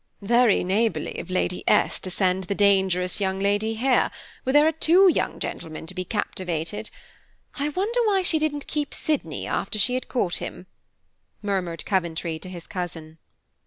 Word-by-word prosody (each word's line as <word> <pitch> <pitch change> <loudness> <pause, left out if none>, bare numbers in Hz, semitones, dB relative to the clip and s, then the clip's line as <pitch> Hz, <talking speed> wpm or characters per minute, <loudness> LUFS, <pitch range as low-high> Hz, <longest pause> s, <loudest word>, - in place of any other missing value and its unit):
"Very 235 +1 +4
neighborly 190 -3 0
of - - -8
Lady 185 0 -1
S. - - +3
to 185 - -4
send 185 0 +1
the 200 - -2
dangerous 190 -3 +2
young 190 -1 0
lady 205 +3 +1
here, 250 +3 +2 0.3
where 260 - -1
there 295 +1 +6
are 320 - +4
two 335 +5 +5
young 355 - +1
gentlemen 160 0 -5
to 185 - -5
be 185 -1 -3
captivated. 185 0 -3 0.6
I 290 +1 -1
wonder 410 +10 -1
why 390 -3 +2
she 325 -3 +4
didn't 290 -2 -1
keep 295 -1 -3
Sydney 305 -2 -1
after 215 - -2
she 250 +5 +3
had 255 0 -3
caught 195 -9 0
him," - - -7 0.8
murmured 185 -5 -2
Coventry 170 -4 -1
to 185 - -10
his 175 -2 -8
cousin. 165 -4 -6
200 Hz, 165 wpm, -24 LUFS, 180-265 Hz, 0.8 s, there